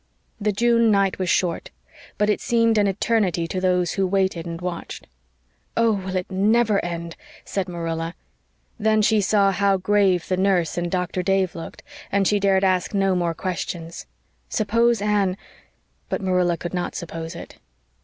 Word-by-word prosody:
The 210 Hz, 0 st, +1 dB
June 230 Hz, +2 st, +3 dB
night 195 Hz, -2 st, +2 dB
was 185 Hz, -2 st, -1 dB
short; 170 Hz, -2 st, 0 dB, 0.5 s
but 210 Hz, -, +2 dB
it 210 Hz, -, +1 dB
seemed 230 Hz, -2 st, +2 dB
an 205 Hz, -, +3 dB
eternity 195 Hz, -4 st, 0 dB
to 185 Hz, +2 st, -3 dB
those 180 Hz, -2 st, +1 dB
who 195 Hz, -1 st, 0 dB
waited 190 Hz, -3 st, 0 dB
and 165 Hz, 0 st, -5 dB
watched. 180 Hz, -1 st, -6 dB, 0.7 s
"Oh, 230 Hz, -1 st, +4 dB
will 190 Hz, -2 st, -3 dB
it 185 Hz, +1 st, -3 dB
NEVER 210 Hz, +2 st, +2 dB
end?" 170 Hz, -1 st, -5 dB, 0.3 s
said 195 Hz, -2 st, -3 dB
Marilla; 165 Hz, -1 st, -4 dB, 0.6 s
then 215 Hz, 0 st, +2 dB
she 215 Hz, 0 st, +3 dB
saw 200 Hz, 0 st, +3 dB
how 195 Hz, 0 st, +2 dB
grave 190 Hz, -2 st, +2 dB
the 185 Hz, -, 0 dB
nurse 185 Hz, -4 st, +1 dB
and 175 Hz, 0 st, -2 dB
Doctor 180 Hz, 0 st, -1 dB
Dave 195 Hz, -1 st, +1 dB
looked, 165 Hz, -, -9 dB, 0.3 s
and 195 Hz, -1 st, +2 dB
she 205 Hz, -, +2 dB
dared 195 Hz, -1 st, +2 dB
ask 185 Hz, +1 st, +1 dB
no 195 Hz, -1 st, +2 dB
more 170 Hz, -2 st, 0 dB
questions. 170 Hz, -2 st, -5 dB, 0.4 s
Suppose 230 Hz, +1 st, +1 dB
Anne 200 Hz, -3 st, +1 dB, 0.7 s
but -, -, -1 dB
Marilla 180 Hz, -3 st, +1 dB
could 175 Hz, -, -6 dB
not 180 Hz, -1 st, -3 dB
suppose 165 Hz, -1 st, -6 dB
it. -, -, -10 dB
190 Hz, 165 wpm, -23 LUFS, 175-205 Hz, 0.7 s, Oh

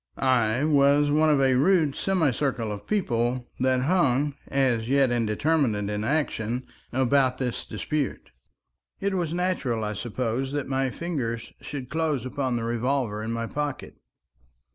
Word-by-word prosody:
I 125 Hz, -1 st, +2 dB
was 145 Hz, -1 st, +4 dB
one 155 Hz, +1 st, +4 dB
of 150 Hz, -2 st, +4 dB
a 135 Hz, -1 st, +4 dB
rude 155 Hz, +1 st, +3 dB
semicircle 140 Hz, -, 0 dB
of 100 Hz, -1 st, -7 dB
people 120 Hz, -, 0 dB
that 130 Hz, 0 st, +2 dB
hung 145 Hz, -3 st, +2 dB
as 125 Hz, -4 st, +1 dB
yet 135 Hz, -2 st, +3 dB
indeterminate 115 Hz, -2 st, +1 dB
in 105 Hz, +1 st, -2 dB
action 125 Hz, -3 st, -1 dB, 0.3 s
about 130 Hz, 0 st, +2 dB
this 125 Hz, -3 st, -3 dB
dispute. 140 Hz, +6 st, -3 dB, 0.7 s
It 200 Hz, 0 st, -1 dB
was 175 Hz, -4 st, -1 dB
natural, 170 Hz, -11 st, -1 dB
I 105 Hz, 0 st, -2 dB
suppose, 120 Hz, +5 st, -2 dB
that 145 Hz, -2 st, -2 dB
my 135 Hz, 0 st, 0 dB
fingers 125 Hz, -8 st, -4 dB
should 135 Hz, -3 st, -6 dB
close 155 Hz, -5 st, 0 dB
upon 130 Hz, -1 st, -2 dB
the 115 Hz, -, -2 dB
revolver 120 Hz, -1 st, -1 dB
in 110 Hz, +1 st, -3 dB
my 115 Hz, 0 st, -2 dB
pocket. 145 Hz, +3 st, -4 dB
130 Hz, 140 wpm, -26 LUFS, 120-145 Hz, 0.7 s, was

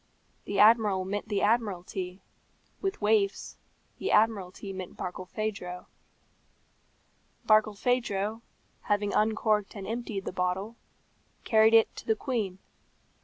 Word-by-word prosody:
The 200 Hz, -, -3 dB
Admiral 210 Hz, -3 st, +5 dB
meant 205 Hz, +2 st, -4 dB
the 205 Hz, -2 st, 0 dB
Admiralty; 190 Hz, -4 st, -1 dB, 0.6 s
with 390 Hz, -, -2 dB
waifs, 205 Hz, -2 st, +1 dB, 0.4 s
the -, -, -2 dB
Admiralty 200 Hz, -3 st, +1 dB
meant 185 Hz, -1 st, -8 dB
Barkilphedro. 185 Hz, 0 st, -5 dB, 1.6 s
Barkilphedro, 215 Hz, 0 st, +1 dB, 0.5 s
having 205 Hz, 0 st, +1 dB
uncorked 215 Hz, -1 st, +1 dB
and 195 Hz, -2 st, -6 dB
emptied 220 Hz, -2 st, -4 dB
the -, -, -3 dB
bottle, 185 Hz, +5 st, -2 dB, 0.7 s
carried 220 Hz, 0 st, +5 dB
it 225 Hz, -, +4 dB
to -, -, -9 dB
the 220 Hz, -, +3 dB
queen. 215 Hz, -7 st, -2 dB
205 Hz, 105 wpm, -28 LUFS, 195-220 Hz, 1.6 s, Admiral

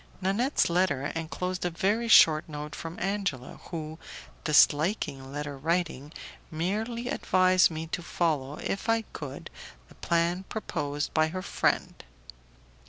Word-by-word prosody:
Nanette's 205 Hz, +9 st, +1 dB
letter 170 Hz, -6 st, +1 dB
enclosed 180 Hz, +3 st, -3 dB
a 180 Hz, -, +1 dB
very 205 Hz, +7 st, 0 dB
short 160 Hz, -8 st, +6 dB
note 150 Hz, 0 st, -6 dB
from 165 Hz, +1 st, -7 dB
Angela, 195 Hz, -11 st, -3 dB
who, 160 Hz, -2 st, -6 dB, 0.4 s
disliking 150 Hz, -2 st, +3 dB
letter 145 Hz, 0 st, -4 dB
writing, 160 Hz, -2 st, -1 dB, 0.4 s
merely 215 Hz, +9 st, -2 dB
advised 185 Hz, -8 st, +3 dB
me 160 Hz, -1 st, -5 dB
to 165 Hz, +2 st, -4 dB
follow, 150 Hz, -5 st, -1 dB
if 200 Hz, +4 st, -3 dB
I 225 Hz, 0 st, +3 dB
could, 140 Hz, -2 st, -7 dB, 0.4 s
the -, -, -15 dB
plan 170 Hz, +2 st, +1 dB
proposed 145 Hz, -9 st, -3 dB
by 155 Hz, 0 st, +3 dB
her 185 Hz, +3 st, -5 dB
friend. -, -, -1 dB
165 Hz, 125 wpm, -28 LUFS, 150-190 Hz, 0.4 s, short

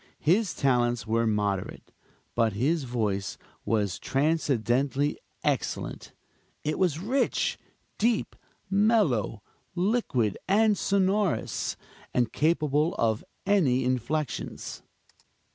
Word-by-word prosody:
His 185 Hz, +4 st, +2 dB
talents 120 Hz, -4 st, +1 dB
were 115 Hz, +1 st, +1 dB
moderate; 105 Hz, -3 st, -2 dB, 0.4 s
but 115 Hz, -3 st, +2 dB
his 140 Hz, +8 st, +1 dB
voice 105 Hz, -5 st, -2 dB, 0.3 s
was 105 Hz, -5 st, 0 dB
transcendently 140 Hz, -1 st, +1 dB, 0.2 s
excellent. -, -, -2 dB, 0.5 s
It 150 Hz, -, -1 dB
was 175 Hz, -6 st, +2 dB
rich, 235 Hz, +11 st, 0 dB, 0.4 s
deep, 230 Hz, +1 st, +1 dB, 0.3 s
mellow, 195 Hz, -, +2 dB, 0.3 s
liquid 175 Hz, -, +1 dB
and 210 Hz, +2 st, +4 dB
sonorous, 195 Hz, -1 st, 0 dB, 0.4 s
and 120 Hz, -2 st, +1 dB
capable 155 Hz, 0 st, +2 dB
of 110 Hz, -1 st, +1 dB, 0.2 s
any 145 Hz, -11 st, +3 dB
inflections. 130 Hz, +3 st, -2 dB
140 Hz, 90 wpm, -27 LUFS, 115-185 Hz, 0.5 s, and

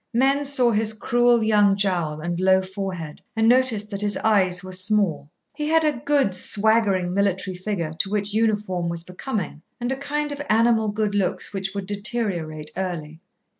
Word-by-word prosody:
Men 275 Hz, +3 st, +2 dB
saw 255 Hz, -4 st, +4 dB
his 215 Hz, 0 st, +1 dB
cruel 240 Hz, +1 st, +2 dB
young 205 Hz, -2 st, +3 dB
jowl 175 Hz, -6 st, 0 dB
and 175 Hz, +1 st, -3 dB
low 190 Hz, 0 st, +4 dB
forehead, 185 Hz, -5 st, -6 dB
and 225 Hz, 0 st, +2 dB
noticed 235 Hz, -4 st, +2 dB
that 200 Hz, 0 st, -3 dB
his 205 Hz, 0 st, 0 dB
eyes 190 Hz, -4 st, +2 dB
were 185 Hz, -, -8 dB
small. 185 Hz, -5 st, +1 dB, 0.2 s
He 300 Hz, -1 st, -4 dB
had 320 Hz, +1 st, +3 dB
a 290 Hz, -6 st, -1 dB
good, 285 Hz, -9 st, +2 dB
swaggering 200 Hz, -2 st, +2 dB
military 190 Hz, -1 st, 0 dB
figure 180 Hz, -4 st, -3 dB
to 195 Hz, -, 0 dB
which 205 Hz, 0 st, -2 dB
uniform 210 Hz, -6 st, 0 dB
was 170 Hz, -1 st, -4 dB
becoming, 180 Hz, -, -5 dB, 0.2 s
and 245 Hz, +1 st, -2 dB
a -, -, 0 dB
kind 290 Hz, +2 st, -3 dB
of 285 Hz, 0 st, -5 dB
animal 225 Hz, 0 st, +3 dB
good 210 Hz, 0 st, -1 dB
looks 200 Hz, -1 st, -1 dB
which 195 Hz, 0 st, -4 dB
would 200 Hz, -1 st, -3 dB
deteriorate 195 Hz, -7 st, -3 dB
early. 170 Hz, -4 st, -5 dB
205 Hz, 170 wpm, -23 LUFS, 185-225 Hz, 0.2 s, saw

